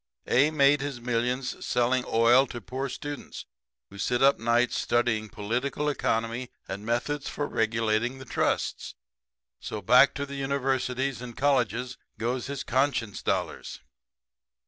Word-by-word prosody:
A 140 +5 +4
made 145 -2 +4
his 140 -3 -4
millions 125 +2 -2
selling 125 +1 +1
oil 120 +4 +5
to 120 - -6
poor 130 +7 -4
students 145 +1 -7 0.5
who 100 - -11
sit 120 +5 +1
up 140 +1 +5
nights 120 +2 +2
studying 115 -3 0
political 125 +9 -2
economy 115 -2 -1 0.2
and 100 +2 -5
methods 120 +6 -1
for 145 - -3
regulating 115 +1 0
the 130 - -10
trusts. - - -1 0.6
So, 110 - -5
back 125 +7 +5
to 140 - -2
the 140 - -9
universities 135 -2 -1
and 120 -2 -8
colleges 125 -3 0 0.2
goes 120 +3 -2
his 140 0 -4
conscience 130 -5 0
dollars. - - -2
125 Hz, 135 wpm, -27 LUFS, 115-135 Hz, 0.6 s, oil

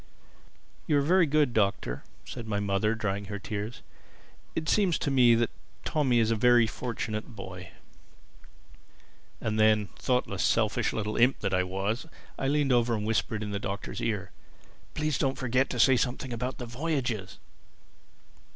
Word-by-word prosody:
"You 150 - +3
are - - +3
very 175 +2 +4
good, 145 -4 +2
Doctor," 100 - 0 0.2
said 120 -3 -7
my 105 -2 -1
mother, 100 +2 +1
drying 100 -2 -2
her 100 +1 -5
tears. 105 +3 -5 0.7
"It 160 -1 -2
seems 195 -6 +3
to 140 - -2
me 125 -3 +6
that 115 -1 +1 0.3
Tommy 135 -6 +2
is 115 -1 +3
a - - +3
very 120 +1 +5
fortunate 110 -1 -4
boy." 95 -3 -8 1.7
And 110 0 -2
then, 110 -2 +4
thoughtless, 125 -1 0
selfish - - +2
little 105 0 -3
imp 125 +3 +3
that 95 - -1
I 95 - +3
was, 95 - -2 0.3
I 135 - 0
leaned 145 -1 +2
over 120 -1 +3
and 105 -1 -3
whispered 110 0 -1
in 105 - -4
the 100 - -2
Doctor's 100 0 -5
ear, 105 -5 -2 0.6
"Please 150 -2 0
don't 135 -1 0
forget 130 +1 +1
to 125 - -4
say 130 +2 +6
something 125 0 -2
about 125 +3 -3
the 125 - -5
voyages." 120 - -3
115 Hz, 160 wpm, -28 LUFS, 105-130 Hz, 1.7 s, me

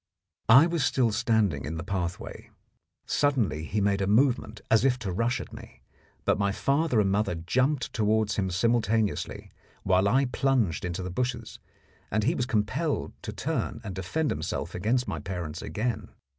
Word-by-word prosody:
I 135 +7 +9
was 170 -3 0
still 125 -3 +2
standing 105 - +1
in 80 +2 -4
the 80 - -4
pathway. 90 -2 -4 0.6
Suddenly 120 - +1
he 105 +6 -1
made 100 -1 +1
a 95 - 0
movement 110 -1 +2
as 110 0 +5
if 130 -2 +3
to 105 -7 -4
rush 115 +7 0
at - - -9
me, - - -12 0.4
but - - +2
my 100 0 +2
father 140 +3 +1
and 95 -2 +2
mother 100 -3 +1
jumped 130 - 0
towards 110 -1 +1
him 95 -2 0
simultaneously, 110 +2 0 0.3
while 95 +1 +3
I 130 +6 +3
plunged 125 - 0
into 90 +1 -3
the 90 - -4
bushes, 125 +6 -3 0.5
and 110 +1 0
he 140 +9 +2
was 125 -7 -2
compelled 105 -3 -1
to - - -5
turn - - -3
and 95 - -5
defend 95 - -1
himself - - -3
against 115 +7 0
my 80 - -3
parents 85 -1 -5
again. 110 -3 -3
110 Hz, 170 wpm, -27 LUFS, 95-125 Hz, 0.6 s, I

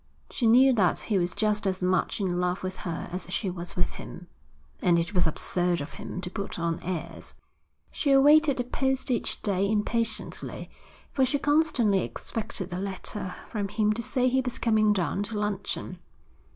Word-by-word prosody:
She 235 - +1
knew 255 +4 +7
that 195 -7 +3
he 205 -4 0
was 175 -1 -1
just 210 -2 +1
as 185 -1 -1
much 185 +3 +1
in 180 -3 0
love 180 +1 -1
with 185 0 -4
her 165 -2 -4
as 180 0 -4
she 195 0 -1
was 175 -1 -5
with 180 - -1
him, 180 - -9 0.6
and 175 -1 +4
it 170 +4 -1
was 180 -3 +3
absurd 175 +2 0
of 145 - -6
him 185 - -6
to 180 - -5
put 200 -1 -5
on 165 -1 -1
airs. 180 -2 -5 0.6
She 290 - -1
awaited 290 +1 +6
the 245 - 0
post 265 +1 -1
each 240 - 0
day 200 -1 +1
impatiently, 220 +1 -1 0.4
for 265 - +2
she 260 +3 +2
constantly 290 -9 +3
expected 205 -5 -4
a 180 - -3
letter 190 0 -4 0.2
from 205 -3 -2
him 215 +1 +1
to 230 - -2
say 250 +2 +1
he 260 +1 +2
was 250 -1 -4
coming 215 -2 +3
down 185 -2 0
to 210 +1 -4
luncheon. 205 -2 -2
205 Hz, 180 wpm, -27 LUFS, 180-235 Hz, 0.6 s, knew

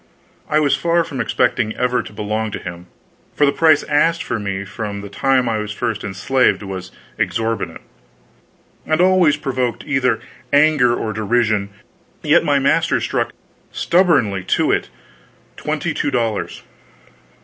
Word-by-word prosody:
I 155 - +3
was 145 -2 +3
far 170 0 +1
from 135 -5 -4
expecting 120 -2 0
ever 125 -1 +1
to - - -11
belong 105 +1 -3
to - - -2
him, 85 0 -8 0.5
for 145 - +4
the 140 - +3
price 160 0 +4
asked 160 +3 +1
for 115 - -3
me 100 -1 -4
from 100 0 -5
the 100 - -8
time 130 +4 +1
I 110 -2 0
was 105 0 -4
first 115 -1 -3
enslaved 115 +5 +1
was 95 -2 -7 0.3
exorbitant, 115 -7 -2 1.1
and 155 +1 +1
always 180 -4 +4
provoked 130 -4 -2
either 130 -6 +1 0.3
anger 145 -4 +4
or 110 -2 -3
derision, 110 -1 0 0.5
yet - - +4
my - - +2
master - - +2
stuck - - -1 0.4
stubbornly 145 - +2
to - - +1
it - - 0 0.7
twenty - - -2
two - - -1
dollars. 115 -3 -2
120 Hz, 145 wpm, -19 LUFS, 105-145 Hz, 1.1 s, for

